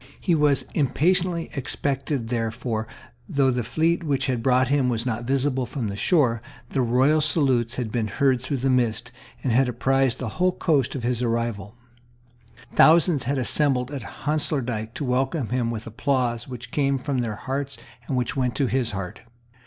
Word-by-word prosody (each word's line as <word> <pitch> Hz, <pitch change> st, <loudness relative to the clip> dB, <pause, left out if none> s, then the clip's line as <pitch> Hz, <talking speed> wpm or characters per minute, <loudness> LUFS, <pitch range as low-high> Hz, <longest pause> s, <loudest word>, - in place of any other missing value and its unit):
He 175 Hz, -, +1 dB
was 150 Hz, -3 st, +3 dB
impatiently 170 Hz, +4 st, +1 dB
expected 135 Hz, -2 st, -2 dB
there 115 Hz, -2 st, 0 dB
for, 115 Hz, -1 st, -4 dB, 0.4 s
though 135 Hz, -2 st, +2 dB
the 125 Hz, -1 st, -1 dB
fleet 165 Hz, +8 st, 0 dB
which 140 Hz, -3 st, 0 dB
brought 130 Hz, +1 st, +3 dB
him 140 Hz, -3 st, +2 dB
was 115 Hz, 0 st, -1 dB
not 120 Hz, -1 st, -2 dB
visible 130 Hz, -1 st, 0 dB
from 120 Hz, -7 st, -3 dB
the 100 Hz, -, -4 dB
shore, 120 Hz, -, +2 dB, 0.3 s
the 135 Hz, -, +1 dB
royal 130 Hz, +6 st, +3 dB
salutes 135 Hz, -6 st, +2 dB
had 120 Hz, -4 st, -3 dB
been 115 Hz, -2 st, -1 dB
heard 130 Hz, +4 st, +1 dB
through 140 Hz, +2 st, -2 dB
the -, -, +3 dB
mist, 120 Hz, -3 st, 0 dB, 0.3 s
and 125 Hz, -, +1 dB
had 130 Hz, +1 st, +3 dB
apprised 130 Hz, +1 st, +1 dB
the 130 Hz, -, -4 dB
whole 180 Hz, +9 st, +1 dB
coast 140 Hz, -8 st, +1 dB
of 130 Hz, -, -4 dB
his 120 Hz, 0 st, -1 dB
arrival. 115 Hz, -3 st, -2 dB, 1.0 s
Thousands 160 Hz, -3 st, +5 dB
had 140 Hz, +3 st, 0 dB
assembled 130 Hz, 0 st, +2 dB
at 140 Hz, -2 st, -5 dB, 0.2 s
Honslaerdyk 125 Hz, -7 st, 0 dB
to -, -, -4 dB
welcome 130 Hz, +1 st, 0 dB
him 125 Hz, -2 st, 0 dB
with 115 Hz, -1 st, -5 dB
applause 120 Hz, 0 st, -1 dB
which 125 Hz, -1 st, -8 dB
came 140 Hz, -2 st, +1 dB
from 130 Hz, 0 st, -2 dB
their 115 Hz, -3 st, -2 dB
hearts 135 Hz, +4 st, -4 dB, 0.3 s
and 135 Hz, -, -1 dB
which 125 Hz, +2 st, -1 dB
went 125 Hz, -4 st, 0 dB
to 135 Hz, -, +1 dB
his 125 Hz, -3 st, -1 dB
heart. 95 Hz, -2 st, -6 dB
130 Hz, 175 wpm, -24 LUFS, 120-140 Hz, 1.0 s, Thousands